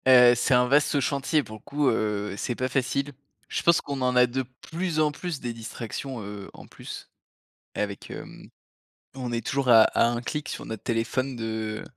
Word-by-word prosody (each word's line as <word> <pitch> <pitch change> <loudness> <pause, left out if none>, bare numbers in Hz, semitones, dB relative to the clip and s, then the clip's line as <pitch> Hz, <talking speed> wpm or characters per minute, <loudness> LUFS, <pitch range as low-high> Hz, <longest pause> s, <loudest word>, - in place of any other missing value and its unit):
Heu, 125 -2 +8
c'est 120 +2 +3
un 125 0 +4
vaste 145 +2 +3
chantier 140 +3 +1
pour 110 -3 -9
le - - -20
coup, 145 +3 -1
heu, 105 -2 -1
c'est 120 - -2
pas 130 +1 -1
facile. 135 +2 0 0.4
Je - - -1
pense 170 0 +4
qu'on 140 -2 -4
en 125 0 +1
a 125 0 +7
de 130 +2 -2 0.3
plus 170 -1 -1
en 155 -1 +3
plus 165 0 -5
des 120 -1 -3
distractions, 115 +2 -6
heu, 100 -1 -8
en - - -12
plus - - -9 0.7
avec, 100 -1 -4
hem, - - -9 0.7
on 125 -2 -4
est 115 0 -2
toujours 140 -2 -1
à 115 -2 +9
à - - +3
un 120 0 0
clic 150 +4 -4
sur - - -5
notre 110 -2 -6
téléphone 120 +3 -1
de 110 -1 -3
125 Hz, 195 wpm, -26 LUFS, 115-140 Hz, 0.7 s, à